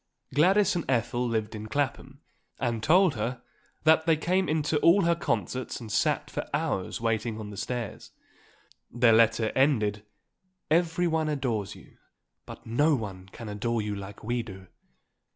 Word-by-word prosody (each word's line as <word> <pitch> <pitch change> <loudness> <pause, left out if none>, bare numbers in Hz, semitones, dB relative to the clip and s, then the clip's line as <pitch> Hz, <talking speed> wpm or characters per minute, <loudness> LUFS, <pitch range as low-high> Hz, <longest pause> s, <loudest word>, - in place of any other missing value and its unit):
Gladys 190 +8 +4
and 170 - -1
Ethel 120 0 0
lived 110 -2 -2
in 110 0 -6
Clapham 140 +3 -3 0.4
and 120 -2 -2
told 180 - +4
her 120 +2 -4 0.4
that 160 +1 +4
they 160 -1 +4
came 185 +4 0
in 155 0 +1
to 150 0 +1
all 180 +6 +5
her 170 0 +3
concerts 130 -6 -2
and 115 -3 -8
sat 150 +6 0
for - - -4
hours 145 - -2
waiting 115 -1 -1
on 105 -1 -7
the - - -8
stairs. 115 +1 -5 0.8
Their 120 -1 +4
letter 115 0 +3
ended: 105 -7 +2 0.7
"Everyone 165 -1 +2
adores 120 -9 -2
you, - - -17 0.5
but - - -10
no 145 +7 +2
one 95 -6 -6
can 115 - -9
adore 110 +2 -2
you 105 0 -3
like 100 +1 -9
we 120 +2 -1
do. 95 -4 -10
120 Hz, 155 wpm, -27 LUFS, 110-155 Hz, 0.8 s, all